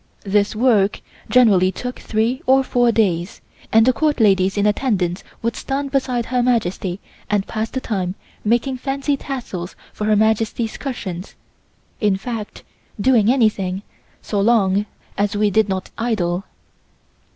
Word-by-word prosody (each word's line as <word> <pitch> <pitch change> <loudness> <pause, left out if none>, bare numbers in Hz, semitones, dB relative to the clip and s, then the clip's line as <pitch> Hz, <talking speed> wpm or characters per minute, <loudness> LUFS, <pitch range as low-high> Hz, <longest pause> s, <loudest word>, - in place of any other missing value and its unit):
This 200 +1 +1
work 215 -4 +3 0.3
generally 200 -7 +5
took 250 +5 -6
three 230 +5 -1
or 265 +1 +5
four 245 -2 +2
days, 185 -5 0 0.3
and 225 0 +6
the 255 - +4
Court 300 0 0
ladies 195 -2 +3
in 205 - +2
attendance 205 -5 0 0.2
would 230 0 -1
stand 275 0 -3
beside 255 -4 0
Her 250 +1 0
Majesty 200 -6 0 0.3
and 205 -2 +1
pass 220 0 -3
the 260 - -4
time 190 -6 -2 0.3
making 240 +4 +1
fancy 275 +2 -1
tassels 235 -11 -6 0.2
for 210 - -4
Her 215 0 +3
Majesty's 220 +1 +1
cushions, 200 -9 -6 0.6
in 205 -3 +2
fact 220 0 -6 0.4
doing 230 -1 +4
anything 205 -6 +1 0.4
so 205 -2 -1
long 205 -2 +3 0.3
as 205 0 +1
we 210 0 +2
did 215 +1 +2
not 190 -1 -3
idle. 195 -5 -1
220 Hz, 140 wpm, -20 LUFS, 195-245 Hz, 0.6 s, and